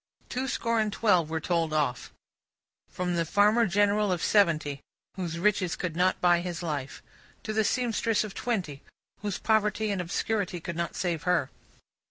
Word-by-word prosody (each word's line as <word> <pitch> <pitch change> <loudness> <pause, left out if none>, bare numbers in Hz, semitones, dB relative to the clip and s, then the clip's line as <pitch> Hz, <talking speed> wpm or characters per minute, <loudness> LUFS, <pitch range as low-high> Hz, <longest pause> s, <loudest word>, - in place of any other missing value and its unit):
Two 260 +1 -2
score 230 -3 0
and 215 -1 +1
twelve 185 -6 +2
were 160 0 -1
told 165 -1 0
off. 140 -5 -1 0.8
From 180 -1 -2
the 170 - +1
farmer 210 +7 +3
general 205 +1 +2
of 175 -3 -1
seventy, 155 -8 +2 0.3
whose 175 -3 -4
riches 185 -1 +1
could 170 -4 -4
not 180 +2 +2
buy 175 -1 +4
his 175 -1 -5
life, 145 -5 -4 0.4
to 215 - -3
the 220 0 +2
seamstress 230 -1 +1
of 210 -2 -7
twenty, 180 - -3 0.4
whose 205 -2 -2
poverty 215 -1 +1
and 195 -2 -1
obscurity 185 +1 -2
could 170 +1 -6
not 170 +1 -3
save 175 -4 -1
her. 165 -6 +1
180 Hz, 165 wpm, -28 LUFS, 170-210 Hz, 0.8 s, buy